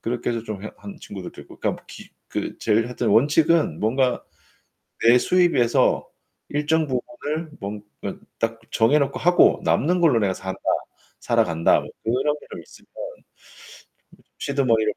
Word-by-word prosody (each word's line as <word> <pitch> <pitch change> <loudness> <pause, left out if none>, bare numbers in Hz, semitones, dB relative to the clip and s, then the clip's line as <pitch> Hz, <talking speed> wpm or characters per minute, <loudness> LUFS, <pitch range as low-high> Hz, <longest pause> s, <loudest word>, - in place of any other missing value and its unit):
그렇게 120 +1 -2
해서 115 -2 -2
좀 105 -3 -6
해 - - -5
한 100 -1 -10
친구들도 95 -3 -8
있고. - - -16
그러니까 - - -2
기 - - -12 0.2
그 - - -4
제일 110 +1 +2
하여튼 125 -1 -2
원칙은 150 - +3
뭔가 125 +4 +1 0.8
내 120 +2 +7
수입에서 155 -7 +3 0.4
일정 155 +2 +1
부분을 150 +4 -4
뭔가 105 +1 -6 0.5
딱 115 0 -2
정해놓고 140 +5 +2
하고 175 +1 +5
남는 180 +4 +2
걸로 155 -9 +4
내가 100 -2 +1
산다. 95 0 -6 0.6
살아간다. 85 0 +2 0.2
그런 130 +6 +1
게 - - -15
좀 - - -6
있으면 - - -18 1.5
시드 140 -1 -2
머니를 110 -4 +2
125 Hz, 295 characters per minute, -23 LUFS, 110-150 Hz, 1.5 s, 내